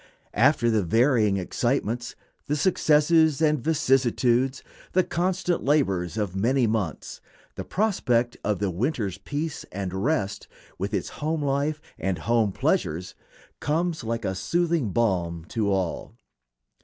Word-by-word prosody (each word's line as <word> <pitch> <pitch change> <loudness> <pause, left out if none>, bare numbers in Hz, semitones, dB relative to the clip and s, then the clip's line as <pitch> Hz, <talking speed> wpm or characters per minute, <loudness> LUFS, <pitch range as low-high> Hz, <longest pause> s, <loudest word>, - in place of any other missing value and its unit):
After 125 0 +3
the 110 -2 +2
varying 110 - +3
excitements, 120 +4 -1 0.3
the 150 - 0
successes 155 -1 +3
and 150 -5 +2
vicissitudes, 130 -3 +2 0.3
the 185 - +4
constant 180 0 -1
labors 100 - +1
of 100 -4 -2
many 120 +6 +2
months, 105 -7 -3 0.3
the - - -6
prospect 125 - 0
of 105 -1 0
the 100 -1 -1
winter's 100 - -2
peace 150 +8 -4
and 95 -1 -4
rest, 100 -1 -1 0.3
with - - -2
its - - -2
home 155 0 -1
life 140 +2 0 0.2
and 95 -2 -1
home 115 +3 +1
pleasures, 90 -1 -1 0.5
comes 160 0 -1
like 115 0 -3
a 95 - 0
soothing 160 - 0
balm 90 -6 0
to 105 -3 0
all. 95 -3 -2
120 Hz, 130 wpm, -25 LUFS, 100-150 Hz, 0.5 s, the